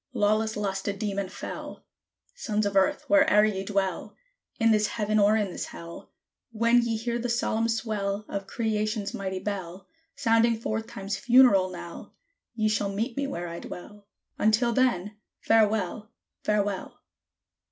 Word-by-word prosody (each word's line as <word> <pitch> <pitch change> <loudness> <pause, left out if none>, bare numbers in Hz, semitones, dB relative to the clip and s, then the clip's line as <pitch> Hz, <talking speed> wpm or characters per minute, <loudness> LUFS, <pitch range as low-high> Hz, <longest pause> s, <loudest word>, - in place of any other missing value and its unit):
Lawless 215 +1 +1
Lust 195 -2 -2
a 200 - +1
demon 200 -2 -3
fell! - - -8 0.5
Sons 215 - -1
of 200 -1 -2
Earth! 195 +10 +2
where'er 280 -8 +5
ye 195 -3 -1
dwell, 195 -1 -2 0.4
In 225 -1 +4
this 215 -1 +3
Heaven, 215 -1 0
or 210 +2 +5
in 205 -3 -1
this - - -4
Hell, 170 0 -10 0.4
When 235 +2 +3
ye 230 -1 -1
hear 235 +1 -2
the 245 +1 -3
solemn 230 -1 0
swell 210 -3 -2
Of 195 -1 -5
Creation's 215 -1 -2
mighty 190 -1 -3
bell 190 -2 -5 0.3
Sounding 230 0 +3
forth 220 0 -3
Time's 195 0 -4
funeral 235 -5 +5
knell, 175 -1 -9 0.4
Ye 215 -2 +1
shall 210 -1 0
meet 225 +5 -3
me 280 0 -1
where 175 -10 -4
I 170 0 -6
dwell; 205 +3 -10 0.3
Until 225 +3 +3
then 215 -5 +1 0.2
FAREWELL! 215 -1 +2 0.4
FAREWELL! 205 -2 -1
210 Hz, 150 wpm, -27 LUFS, 195-225 Hz, 0.5 s, where'er